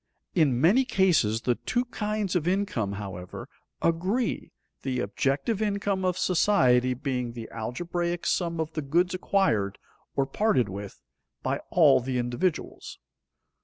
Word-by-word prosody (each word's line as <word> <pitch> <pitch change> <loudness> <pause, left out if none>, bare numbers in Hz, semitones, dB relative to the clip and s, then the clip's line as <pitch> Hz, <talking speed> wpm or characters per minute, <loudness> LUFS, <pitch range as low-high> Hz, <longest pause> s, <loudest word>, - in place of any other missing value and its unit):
In 145 -8 +3
many 195 - +5
cases 165 - +2
the 125 - +2
two 245 - -1
kinds 210 -4 -2
of 170 -2 0
income, 180 - 0
however, 95 -3 -7 0.4
agree, 190 +9 0 0.3
the 130 -2 -2
objective 135 - -1
income 200 -2 0
of 180 -1 +1
society 130 -10 +3
being 125 -2 -3
the 115 -2 -7
algebraic 170 +9 -3
sum 170 -2 0
of 160 0 -2
the 155 - -2
goods 170 +6 +1
acquired 180 - +1 0.4
or 135 - +2
parted 135 - +1
with 100 +1 -8 0.4
by - - -1
all - - +6
the 130 +1 -2
individuals. 125 +9 -2
160 Hz, 130 wpm, -27 LUFS, 125-190 Hz, 0.4 s, all